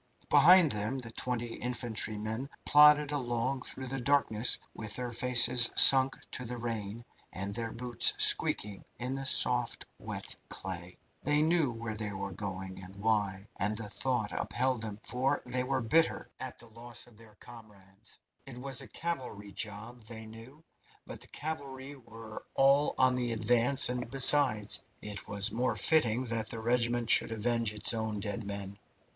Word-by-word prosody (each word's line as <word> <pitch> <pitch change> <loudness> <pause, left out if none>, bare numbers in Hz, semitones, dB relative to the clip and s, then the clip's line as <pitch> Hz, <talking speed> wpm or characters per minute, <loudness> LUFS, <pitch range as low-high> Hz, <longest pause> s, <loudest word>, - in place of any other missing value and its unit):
Behind 160 +2 +6
them 105 +5 -2
the 120 -3 -8
twenty 120 0 -4
infantrymen 115 0 -2 0.2
plodded 150 0 +5
along 130 -1 -2
through 130 - -4
the 135 +1 -5
darkness 125 -4 +1 0.2
with 110 -1 -7
their 125 -1 -5
faces 120 0 +6
sunk 135 0 +8
to 125 - -4
the 125 0 -7
rain, 115 -1 -6 0.3
and 100 +2 -4
their 115 +1 -4
boots 120 -1 +3
squeaking 100 -1 0
in 125 +2 -4
the 135 0 -5
soft, - - +3
wet - - -5
clay. 90 -1 -7 0.2
They 150 0 +1
knew 160 -3 +1
where 115 -1 -6
they 105 -1 -6
were 100 0 -6
going, 95 -1 -7
and 95 +1 -11
why, 100 -2 -2
and 105 +2 -1
the 110 -3 -6
thought 120 -3 -2
upheld 130 -1 -2
them, 105 -2 -7
for 130 +3 -2
they 125 +1 -2
were 130 0 -2
bitter 160 +9 0
at 130 -1 -7
the 120 - -7
loss 120 +1 -10
of 120 - -21
their 110 -2 -15
comrades. 105 -3 -16 0.3
It 130 -3 -10
was 135 +1 -3
a 135 - -11
cavalry 125 -8 -6
job, 110 +4 -7
they 110 -1 -9
knew, 115 +8 -14 0.4
but - - -10
the - - -8
cavalry 140 -3 -7
were 115 -3 -12
all 140 +2 +2
on 130 -1 +3
with 125 - -2
the 120 -1 -2
advance, 120 +5 +4
and, 125 -1 -4
besides, 130 -5 +4 0.2
it 105 -1 -9
was 100 +1 -1
more 120 +1 -2
fitting 125 +1 +1
that 115 -2 -3
the 115 - -5
regiment 120 0 0
should - - +5
avenge 115 0 -1
its 105 +2 0
own 110 -2 -4
dead 105 +2 -5
men. 100 0 -7
120 Hz, 165 wpm, -30 LUFS, 105-130 Hz, 0.4 s, sunk